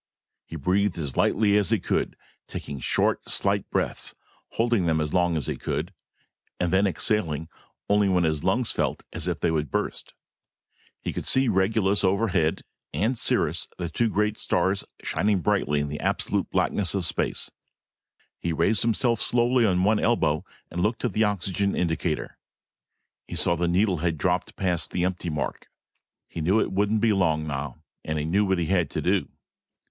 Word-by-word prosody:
He - - -8
breathed 95 +5 +1
as 70 -6 -4
lightly 105 -1 +3
as 105 - +2
he 115 - +3
could, - - -1 0.3
taking 70 -1 -6
short, - - 0
slight - - 0
breaths, - - -2 0.4
holding 115 -6 +1
them 80 -1 +2
as 75 -1 -2
long 90 -2 +2
as 75 - -2
he - - -2
could 85 +6 -3 0.7
and 90 0 0
then 100 +2 +4
exhaling 80 -6 0 0.4
only 100 -1 +3
when 90 -2 +3
his 80 -3 0
lungs 110 +6 +2
felt - - -1
as - - -4
if - - -1
they - - +2
would 75 -3 -1
burst. - - -2 0.9
He - - -3
could - - -4
see 130 0 +3
Regulus 100 0 +2
overhead, 95 -5 +1 0.3
and 115 +5 0
Sirius, - - +1
the 85 -2 -3
two 115 +7 +1
great 105 +1 0
stars 95 +2 +1 0.2
shining 105 -2 +1
brilliantly 75 -1 +1
in 75 - -2
the 75 +1 -5
absolute - - 0
blackness 100 -3 0
of 95 -3 0
space. - - -1 0.9
He 85 - -2
raised 85 +7 +2
himself 115 0 +1
slowly 120 0 +3
on 90 -2 +2
one 105 +2 +3
elbow 80 -10 +1 0.3
and 90 - -2
looked 110 +6 0
at 120 - -1
the 110 +2 +3
oxygen 100 0 0
indicator. 80 -2 -2 0.9
He - - -6
saw 85 - +3
that 85 - -7
the 85 - +2
needle 95 +2 +2
had 80 0 -1
dropped 90 +3 -1
past 90 -3 0
the 90 - 0
empty 90 -1 -2
mark. 75 -5 -4 0.6
He 85 - -6
knew 95 +7 +3
it - - 0
wouldn't 105 +2 +1
be 115 -2 +4
long 80 -5 +1
now. 75 +1 -5 0.2
And 80 0 -2
he 75 - -1
knew 100 +6 +2
what 95 -1 +1
he 85 - 0
had 90 0 +1
to - - -3
do. - - +1
95 Hz, 180 wpm, -25 LUFS, 80-105 Hz, 0.9 s, then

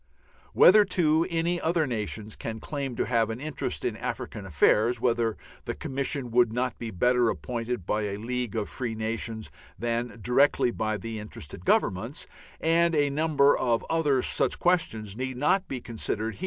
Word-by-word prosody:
Whether, 210 +3 +8
too, 165 -3 +2
any 170 +1 0
other 165 -1 +1
nations 110 -3 -4
can 110 -1 -5
claim 140 0 -4
to - - 0
have 115 -2 +1
an 115 +1 -4
interest 155 +1 -4
in - - -1
African 100 -3 -5
affairs, 110 - +3
whether 115 -2 +1 0.3
the - - -3
Commission 135 -2 -2
would 120 -1 +4
not 125 0 -2
be 115 - -4
better 125 +4 +2
appointed 120 -4 -3
by 105 +2 0
a 100 -1 -3
League 120 0 -3
of 110 -2 -1
Free 120 -4 -4
Nations 110 0 -3 0.3
than 120 0 -2
directly 125 +2 +3
by 110 -2 -2
the 110 +2 -6
interested 105 -8 -8
Governments, 110 +9 +1 0.3
and 170 +1 +3
a 145 -1 +2
number 145 -1 +3
of 120 -3 0
other 150 -6 +2
such - - 0
questions, 110 - 0
need 130 +1 -4
not 185 +8 +2
be 130 - -4
considered 115 -1 -3
here. - - -16
120 Hz, 170 wpm, -27 LUFS, 110-145 Hz, 0.3 s, Whether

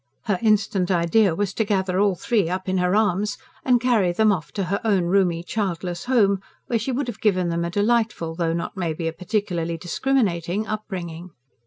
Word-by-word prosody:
Her 200 -4 0
instant 210 -4 +2
idea 180 +1 +3
was 200 +1 -1
to 220 - +1
gather 190 -3 0
all 200 -2 +3
three 200 -2 0
up 185 +1 -3
in 185 0 +1
her 180 +2 +2
arms 205 -1 +1 0.3
and 250 -2 +4
carry 230 -7 +2
them 215 +4 +3
off 170 -6 -3
to 200 - -1
her 195 +3 -2
own 200 -5 +2
roomy, 175 -2 +2
childless 180 -3 -3
home, 205 -6 +3 0.3
where 235 - 0
she 230 +5 -2
would 265 +3 -1
have 230 -3 -6
given 185 -5 +2
them 170 0 -1
a 170 - -2
delightful, 210 -3 0
though 165 -1 -1
not 170 - -4
maybe 165 -3 -2
a 165 - -2
particularly 170 -2 -2
discriminating 190 -1 0
upbringing. 185 -5 -5
190 Hz, 190 wpm, -23 LUFS, 175-215 Hz, 0.3 s, and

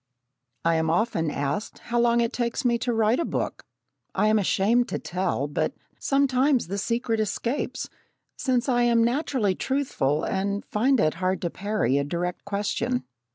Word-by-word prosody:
I 165 -1 +3
am 160 0 +1
often 170 -3 +1
asked 145 +7 -3
how 240 0 -2
long 235 0 +4
it 235 - 0
takes 240 +3 -2
me 235 -1 +3
to 245 - -1
write 225 +1 +2
a - - +1
book. - - -3 0.5
I 210 +2 +3
am 215 0 +4
ashamed 215 +5 +2
to - - -2
tell, 180 -6 -2
but 145 - -1 0.2
sometimes 275 -1 +2
the 200 +1 -2
secret 230 +1 -1
escapes, 230 +5 -2 0.5
since 255 -1 0
I 245 -2 +2
am 235 -1 +4
naturally 240 -4 +1
truthful, 185 - 0
and 200 +1 -1
find 255 +5 +2
it 155 - +3
hard 185 +1 +1
to 170 - -1
parry 200 - 0
a - - +1
direct 175 +4 -3
question. 200 -11 -1
215 Hz, 165 wpm, -25 LUFS, 180-240 Hz, 0.5 s, long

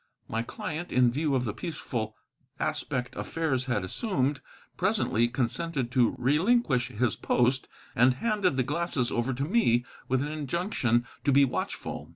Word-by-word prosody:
My 115 - -1
client, 160 +8 -5
in 125 -1 +4
view 145 +2 0
of 125 - +1
the 110 -4 -2
peaceful 115 -9 -4 0.4
aspect 125 -1 -2
affairs 145 -6 -1
had 120 -7 0
assumed, 140 - -1 0.3
presently 185 - +2
consented 130 +2 -2
to 125 -3 +3
relinquish 150 - +2
his 115 +1 0
post, 125 +2 +1 0.3
and 125 +2 +5
handed 200 - +1
the 130 - +3
glasses 150 -2 -1
over 120 +2 0
to 135 +2 -2
me 125 - +3 0.2
with 130 +1 +1
an 145 - -3
injunction 145 - 0 0.2
to 140 - +3
be 140 +1 +6
watchful. 130 - -4
130 Hz, 150 wpm, -28 LUFS, 120-160 Hz, 0.4 s, be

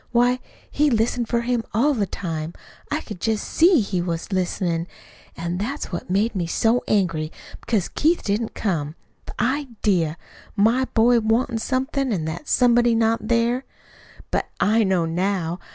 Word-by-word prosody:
Why, 245 +1 +3 0.3
he 300 +1 +3
listened 235 0 +1
for 235 0 +1
him 240 -1 0
all 285 +7 +3
the 210 -6 0
time. 165 -3 -4 0.4
I 300 +2 -1
could 195 -6 -9
just 220 -2 -1
SEE 335 -4 +5
he 190 -3 -1
was 170 +2 -3
listenin'. 175 -2 -1 0.5
An' 170 +2 -3
that's 260 +6 -4
what 175 - -5
made 205 +5 +1
me 180 -5 -2
so 225 +8 +2
angry, 165 -6 +1 0.3
because 210 -7 0
Keith 330 +3 +1
didn't 215 +2 -1
come. 160 -7 -2 0.3
The - - -10
idea! 225 - 0 0.4
My 230 +5 +3
boy 235 +1 +5
wantin' 225 +1 +1
somebody, 260 0 -1
an' 160 -4 -3
that 160 - -5
somebody 240 -1 +4
not 225 -1 +1
there! 235 +2 +1 0.7
"But - - 0
I 220 +2 +3
know 190 -4 +2
now. 175 0 -1
220 Hz, 155 wpm, -23 LUFS, 180-245 Hz, 0.7 s, SEE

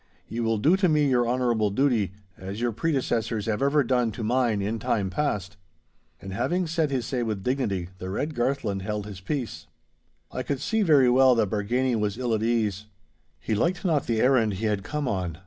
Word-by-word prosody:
Ye 115 - -5
will 115 -1 +1
do 155 - +4
to 190 -3 +2
me 150 -2 +3
your 120 -3 +2
honourable 120 -4 +1
duty, 115 -4 +1 0.2
as 95 +3 -7
your 120 0 0
predecessors 115 -5 -1
have 105 -2 -1
ever 140 +1 +3
done 125 -2 +1
to 115 - -5
mine 120 -2 +1
in 105 +3 -2
time 100 -2 -1
past.' 100 -7 -2 0.6
And 95 0 -8
having 155 - 0
said 160 -2 0
his 130 -4 -1
say 125 -1 -2
with 110 -4 -3
dignity, 100 -9 -1
the 95 - -5
red 145 +11 -2
Garthland 120 -6 -1
held 105 +1 -3
his 100 -3 -9
peace. 100 - -4 0.6
I 130 - -3
could 140 +1 -2
see 220 - 0
very 145 -9 +5
well 130 0 +5
that 110 -5 +1
Bargany 120 +5 0
was 105 -1 -1
ill 125 -2 -1
at 110 - 0
ease. 110 -3 0 0.5
He 110 - -3
liked 170 - 0
not 155 -6 +1
the 115 -2 +1
errand 125 -5 +3
he 110 +4 -3
had 105 -2 0
come 150 +6 -3
on. 90 -7 -2
115 Hz, 200 wpm, -26 LUFS, 105-135 Hz, 0.6 s, very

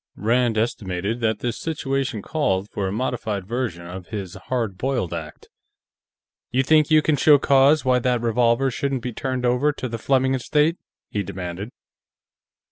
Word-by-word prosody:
Rand 115 +1 +1
estimated 105 -1 -2
that 110 -3 0
this 120 -2 -2
situation 135 -8 -2
called 100 -11 0
for 100 -2 -2
a - - -2
modified 110 -3 -2
version 110 -6 -3
of 90 +1 -8
his 100 -5 -5
hard 110 +1 -3
boiled 120 -6 -2
act. 80 -3 -7 1.0
"You 130 +1 +1
think 155 +2 +4
you 155 -1 +5
can 155 - +2
show 145 +2 +6
cause 140 +1 +4
why 125 -1 +3
that 125 0 +1
revolver 120 +3 +2
shouldn't 135 0 -2
be 125 - -4
turned 130 +1 -2
over 125 +5 +2
to 130 - -5
the 115 -1 -5
Fleming 130 +2 +2
estate?" 150 +6 +1 0.3
he 105 - -1
demanded. 90 +2 -6
120 Hz, 160 wpm, -23 LUFS, 100-135 Hz, 1.0 s, show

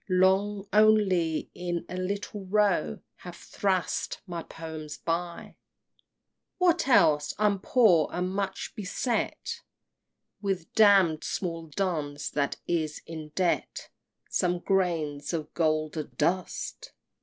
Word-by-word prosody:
Long, 195 +2 +2
only, 205 -7 +3
in 175 -1 -3
a - - -6
little 200 +1 -4
Row, 195 - +1 0.2
Have - - -10
thrust 190 -3 -1
my 175 -3 -5
poems 160 -2 -8
by! 170 +1 -3
XXVII. - - -38 1.0
What 350 -5 +3
else? 155 - +4
I'm 205 -2 +2
poor, 190 - +4
and 180 +1 -2
much 195 -1 -3
beset 220 +4 -2 0.8
With 195 -5 -3
damn'd 195 -7 +5
small 165 -3 -3
duns 150 -4 -2
that 145 -1 0
is 160 -3 -1
in 160 -2 -7
debt 180 -2 -1 0.4
Some 180 -1 +1
grains 170 -6 -1
of 155 -2 -4
golden 155 -2 0
dust! 185 - -2
180 Hz, 110 wpm, -28 LUFS, 160-200 Hz, 1.0 s, damn'd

